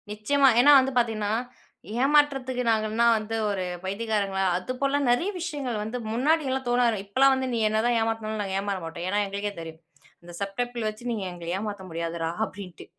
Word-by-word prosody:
நிச்சயமா. 245 +7 +2
ஏன்னா 285 +4 +7
வந்து 265 0 0
பார்த்தீங்கன்னா, 220 -3 +1 0.7
ஏமாற்றத்துக்கு 270 -3 +2
நாங்கன்னா 220 +1 +1
வந்து 215 +1 -4
ஒரு 195 -2 -2 0.2
பைத்தியக்காரங்களா! 200 -1 -1
அது 185 +7 -5
போல 280 +1 +2
நிறைய 335 +11 +1
விஷயங்கள் 285 -9 -3
வந்து 220 +4 -4
முன்னாடிலாம் 265 +1 +1
தோணாது. 240 -2 +2
இப்பலாம் 265 +7 +4
வந்து 260 0 -2
நீ 230 - 0
என்ன 215 0 +1
தான் 240 0 +2
ஏமாத்துனாலும் 220 -1 -2
நாங்க 195 -1 -2
ஏமாற 200 0 -2
மாட்டோம். 165 +1 -6
ஏன்னா 205 +2 +1
எங்களுக்கே 200 +1 -4
தெரியும். 160 -1 -9 0.4
அந்த 175 0 -12
சப் 200 -1 -4
டப்பில் 240 -2 -2
வச்சு 220 +3 -7
நீங்க 220 -4 -3
எங்கள 170 -1 -9
ஏமாற்ற 205 -1 -5
முடியாதுடா! 165 0 -3 0.2
அப்பிடின்ட்டு. 185 -6 -10
220 Hz, 170 wpm, -26 LUFS, 200-250 Hz, 0.7 s, ஏன்னா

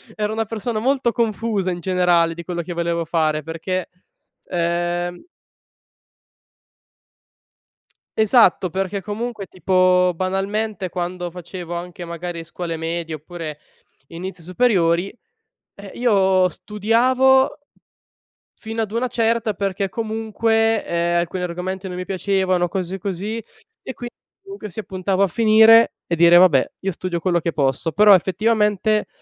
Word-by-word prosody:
ero 210 0 -2
una 225 0 -1
persona 220 +1 -3
molto 260 0 +1
confusa 220 -4 -1
in 175 - -4
generale, 175 -2 +2
di 170 - -7
quello 175 0 -3
che 175 - -6
volevo 170 0 -1
fare, 155 -2 0
perché 170 +4 -4 0.6
ehm 175 0 -2 2.9
Esatto, 220 -5 +4
perché 195 +2 -3
comunque, 215 +1 -5
tipo 185 -1 +2
banalmente, 195 +2 -2
quando 180 0 -4
facevo, 175 0 -8
anche 175 0 -7
magari, 170 0 -6
scuole 165 0 -5
medie, 165 0 -4
oppure 155 -1 -7 0.5
inizio 180 +1 -7
superiori, 185 -1 +1 0.6
eh, 200 -1 -11
io 190 -6 +3
studiavo, 250 +8 +2 1.0
fino 225 0 -5
ad 215 - -3
una 235 +3 -1
certa, 230 -2 0
perché 195 0 -2
comunque, 225 +1 0
ehm, 170 0 0
alcuni 175 +2 -3
argomenti 185 +2 -4
non 180 - -6
mi 180 - -4
piacevano, 185 -1 0
o - - -3
cose 185 +1 -4
così, 200 +3 -4 0.4
e 260 - -7
quindi 240 -1 -9 0.3
comunque 395 - -9
sia 220 +3 -6
puntavo 190 0 -1
a - - +3
finire 225 +3 +6
e 170 - -1
dire: 170 +1 +6
"Vabbè, 175 -8 +5
io 195 - -2
studio 180 -1 -4
quello 175 -1 +1
che 165 0 -3
posso". 140 +3 0
Però 210 +4 +7
effettivamente 210 +2 +2
185 Hz, 130 wpm, -21 LUFS, 175-215 Hz, 2.9 s, Però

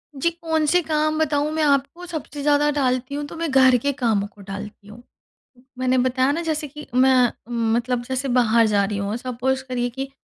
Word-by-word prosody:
जी, 275 +5 +1
कौन 325 -2 -1
से 355 +4 +3
काम 310 -1 0
बताऊँ 300 -1 +1
मैं 315 - 0
आपको 285 +5 0
सबसे 310 -4 -6
ज़्यादा 295 0 +3
टालती 260 -1 -1
हूँ, 290 - -3
तो 290 - -9
मैं 330 -1 -2
घर 260 -1 +5
के 285 - +1
कामों 220 -6 0
को 205 - -18
टालती 200 +1 -9
हूँ। 215 +3 -12 0.8
मैंने 255 0 +2
बताया 255 +2 +2
ना, 330 - -2
जैसे 310 -2 -2
कि 300 +2 -11
मैं, 255 -1 +4 0.4
मतलब, 240 +1 -1
जैसे 260 +2 -3
बाहर 230 -1 +4
जा 205 -2 +2
रही 205 0 -3
हूँ, 200 +2 -2
सपोज़ 255 +2 -2
करिए 245 -1 -1
कि 270 +3 -6
265 Hz, 200 wpm, -22 LUFS, 240-295 Hz, 0.8 s, घर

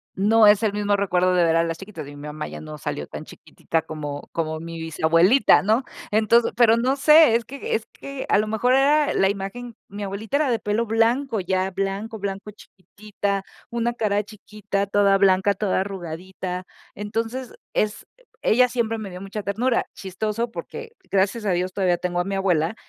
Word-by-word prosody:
no 215 +3 +5
es 205 +1 +5
el 210 -2 +1
mismo 205 0 +1
recuerdo 185 -2 +1
de 180 -1 +3
ver 165 - +2
a 165 - +3
las 165 -1 -3
chiquitas, 195 -6 -9
y 145 - -10
mi 145 +1 -9
mamá 150 0 -5
ya - - -8
no 155 -1 -8
salió 75 - -4
tan - - -8
chiquitita 165 -1 -4
como 145 -2 -6
como 160 -1 -3
mi 165 0 -7
bisabuelita, 165 - +4
¿no?, 220 +6 +2 0.3
entonces 220 +2 +3
pero 230 -2 +5
no 255 +4 +1
sé, 300 -3 +6
es 235 - +1
que 275 +2 -4
es 220 - -3
que 275 -1 -7
a - - +4
lo 215 - +1
mejor 220 +4 +1
era 290 +2 +3
e - - -2
la 195 - +3
imagen 205 +4 -5
mi 205 +1 -6
abuelita 205 +7 -2
era 295 -3 +1
de 230 - 0
pelo 210 +3 -1
blanco 230 +2 +1
ya, 185 +1 0
blanco, 195 +4 -3
blanco, 200 +1 -5
chiquitita, 200 0 -5 0.3
una 235 0 -1
cara 210 -3 0
chiquita, 205 -1 -4
toda 200 -1 +3
blanca, 195 0 +3
toda 195 -1 0
arrugadita. 185 0 -6 0.3
Entonces, 225 +5 -4 0.2
es 210 0 -1
eh, - - -26 0.2
ella 250 +3 +4
siempre 230 -2 -1
me 210 -3 -6
dio 180 - -8
mucha 200 +1 -6
ternura. 235 +6 0
Chistoso 215 +5 -3
porque, 460 - -8 0.2
gracias 200 +3 +1
a 195 - +1
Dios, 180 +1 -1
todavía 185 -3 +1
tengo 175 0 -2
a - - -1
mi 195 +1 -3
abuela 180 -2 +1
205 Hz, 195 wpm, -23 LUFS, 185-225 Hz, 0.3 s, sé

